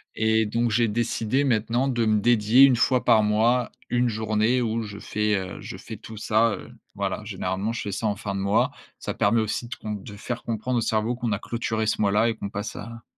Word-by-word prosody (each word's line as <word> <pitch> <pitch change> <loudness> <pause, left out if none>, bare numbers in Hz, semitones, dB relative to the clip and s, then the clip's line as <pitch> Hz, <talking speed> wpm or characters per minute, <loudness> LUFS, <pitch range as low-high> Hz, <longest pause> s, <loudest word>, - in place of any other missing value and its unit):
et 110 0 +2
donc, 115 +2 0
j'ai 115 +1 +3
décidé 115 +3 0
maintenant 120 0 +1
de 120 -3 +1
me 110 -1 +2
dédier 115 +2 +5
1 135 -2 +7
fois 125 +2 +2
par 110 -1 +5
mois, 115 +4 +2 0.2
1 120 0 +2
journée 110 +3 +1
où 115 -1 -1
je 105 -1 -8
fais, 105 0 0
heu, 95 -2 -4
je - - -7
fais - - -9
tout 110 - -10
ça, 110 +2 +2
heu, - - -11 0.2
voilà. - - -2
Généralement, 95 +5 -2
je 115 - -4
fais 100 - -4
ça 110 +3 -2
en 105 - 0
fin 100 -1 -5
de - - -2
mois. 100 +1 +2 0.3
Ça - - -4
permet 115 -1 +2
aussi 110 +2 -2
de - - -6
comp 105 -2 -6
de 105 - -10
faire 120 +3 -5
comprendre 115 +2 -2
au - - +1
cerveau 110 +2 0
qu'on 120 -3 -2
a 100 - -2
clôturé 110 -2 -2
ce - - 0
mois-là 105 +3 +3
et 115 - -2
qu'on 100 - -5
passe 105 +2 -5
à 115 +1 -9
110 Hz, 230 wpm, -25 LUFS, 105-120 Hz, 0.3 s, 1